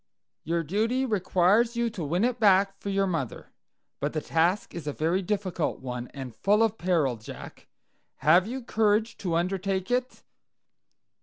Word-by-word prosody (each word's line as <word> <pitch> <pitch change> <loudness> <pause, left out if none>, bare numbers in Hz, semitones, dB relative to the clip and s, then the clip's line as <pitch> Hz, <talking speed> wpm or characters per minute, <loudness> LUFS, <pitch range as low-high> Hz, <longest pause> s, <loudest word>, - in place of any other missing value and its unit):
"Your 165 +2 -1
duty 225 - 0
requires 205 +2 +2
you 235 -1 0
to 185 -6 -5
win 170 +7 0
it 245 0 0
back 195 -2 +4
for 200 - -5
your 195 0 +1
mother. 165 - -4 0.5
But 145 +1 -2
the 155 - 0
task 170 +6 0
is 165 -4 -7
a 145 - -1
very 165 +6 0
difficult 185 -4 -2
one, 125 -1 -5
and 130 -5 -8
full 210 - +3
of 225 -1 0
peril, 160 -9 +1
Jack. 110 - -11 0.5
Have 175 +5 +4
you 255 +2 -5
courage 220 0 +1
to 175 -4 -2
undertake 190 +3 -1
it?" 250 +1 -1
190 Hz, 160 wpm, -27 LUFS, 165-215 Hz, 0.5 s, back